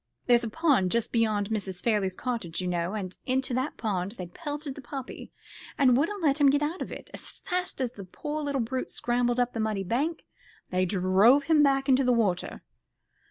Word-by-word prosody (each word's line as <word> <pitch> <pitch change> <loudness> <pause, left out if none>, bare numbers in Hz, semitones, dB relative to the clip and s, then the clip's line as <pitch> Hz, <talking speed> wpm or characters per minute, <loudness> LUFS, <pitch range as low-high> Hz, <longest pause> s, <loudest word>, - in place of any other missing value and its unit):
There's 240 -1 +4
a 230 - -2
pond 280 - +2
just 235 +3 0
beyond 215 -3 +1
Mrs. 195 -4 -2
Farley's 205 -5 0
cottage, 230 -10 -3
you 185 - -2
know, 175 +2 -1
and 185 -4 -5
into 260 0 0
that 260 +4 -2
pond 195 -3 -2
they'd 180 -6 -8
pelted 295 -3 -5
the 280 - -10
puppy, 265 +1 -7 0.5
and 255 -3 +5
wouldn't 340 +8 0
let 290 -1 +2
him 280 - +7
get 290 +2 +2
out 320 +5 -2
of - - -4
it. - - -9
As - - -5
fast 360 -3 -4
as 255 -3 -1
the 205 -5 -9
poor 295 +11 -5
little 285 -3 -1
brute 255 +3 -3
scrambled 245 0 0
up 245 0 +1
the 225 - -4
muddy 215 -3 -1
bank 280 - -1 0.5
they 185 0 +2
drove 195 +9 +4
him 305 +1 +4
back 275 -1 +3
into 270 0 +4
the 250 -1 +3
water." 200 -7 0
245 Hz, 205 wpm, -28 LUFS, 200-280 Hz, 0.5 s, him